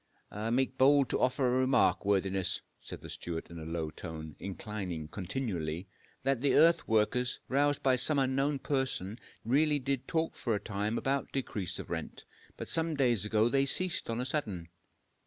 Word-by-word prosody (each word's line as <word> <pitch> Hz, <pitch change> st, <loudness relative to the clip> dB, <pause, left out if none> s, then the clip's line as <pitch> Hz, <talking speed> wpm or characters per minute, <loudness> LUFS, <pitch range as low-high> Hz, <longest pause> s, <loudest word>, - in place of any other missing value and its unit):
"I 105 Hz, +2 st, -3 dB
make 130 Hz, +2 st, 0 dB
bold 140 Hz, -1 st, +5 dB
to -, -, 0 dB
offer 130 Hz, +1 st, +2 dB
a 125 Hz, +1 st, +2 dB
remark, 130 Hz, 0 st, +3 dB
worthiness," 95 Hz, -2 st, 0 dB, 0.2 s
said -, -, -9 dB
the -, -, -10 dB
steward 85 Hz, -1 st, -5 dB
in 85 Hz, -, -8 dB
a 80 Hz, -, -7 dB
low 80 Hz, -1 st, -3 dB
tone, 80 Hz, -2 st, -8 dB
inclining 95 Hz, -5 st, -5 dB
continually, 90 Hz, -5 st, -3 dB, 0.4 s
"that 135 Hz, -2 st, +1 dB
the 140 Hz, -, +3 dB
earth 165 Hz, +1 st, +5 dB
workers, 115 Hz, +3 st, +1 dB
roused 145 Hz, +1 st, +1 dB
by 130 Hz, -2 st, +4 dB
some 145 Hz, +4 st, +5 dB
unknown 135 Hz, +2 st, +1 dB
person, 130 Hz, -7 st, -2 dB, 0.3 s
really 145 Hz, +5 st, +3 dB
did 135 Hz, -1 st, -2 dB
talk 160 Hz, 0 st, 0 dB
for 115 Hz, -3 st, -1 dB
a -, -, -1 dB
time 105 Hz, +2 st, -2 dB
about 135 Hz, +1 st, -1 dB
decrease 105 Hz, -8 st, -2 dB
of -, -, -8 dB
rent. -, -, -5 dB, 0.3 s
But -, -, -6 dB
some 165 Hz, -1 st, +1 dB
days 120 Hz, -7 st, +2 dB
ago 110 Hz, +1 st, +3 dB
they 135 Hz, +2 st, +2 dB
ceased 180 Hz, +1 st, +1 dB
on 115 Hz, +1 st, -1 dB
a 125 Hz, -, -1 dB
sudden." 105 Hz, -, -3 dB
125 Hz, 175 wpm, -31 LUFS, 100-135 Hz, 0.4 s, bold